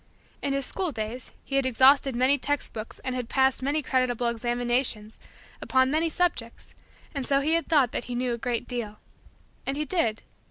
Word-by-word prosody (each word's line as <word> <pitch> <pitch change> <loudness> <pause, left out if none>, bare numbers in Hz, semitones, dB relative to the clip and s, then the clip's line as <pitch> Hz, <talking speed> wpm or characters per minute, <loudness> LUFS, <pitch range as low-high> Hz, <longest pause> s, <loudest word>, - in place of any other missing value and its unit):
In 280 - -1
his 275 -1 -1
school 370 +3 -2
days, 225 +1 -5 0.2
he 275 - -1
had 275 - +2
exhausted 265 +1 +5
many 260 +3 +3
text 290 +1 -1
books 220 0 -7
and 260 - -2
had 250 -2 -4
passed 265 -1 +2
many 290 +3 0
creditable 255 -2 0
examinations 240 -2 -1 0.4
upon 260 0 +2
many 320 +2 +1
subjects 315 -9 -2 0.4
and 275 -4 -4
so 275 -1 +3
he 310 +3 +1
had 335 0 +1
thought 285 -7 +3
that - - -4
he 245 - -5
knew 245 0 -1
a - - -3
great 240 -2 -2
deal. 225 -4 -4 0.7
And 270 +1 -3
he 300 - -1
did. 235 -10 +1
260 Hz, 190 wpm, -26 LUFS, 240-280 Hz, 0.7 s, exhausted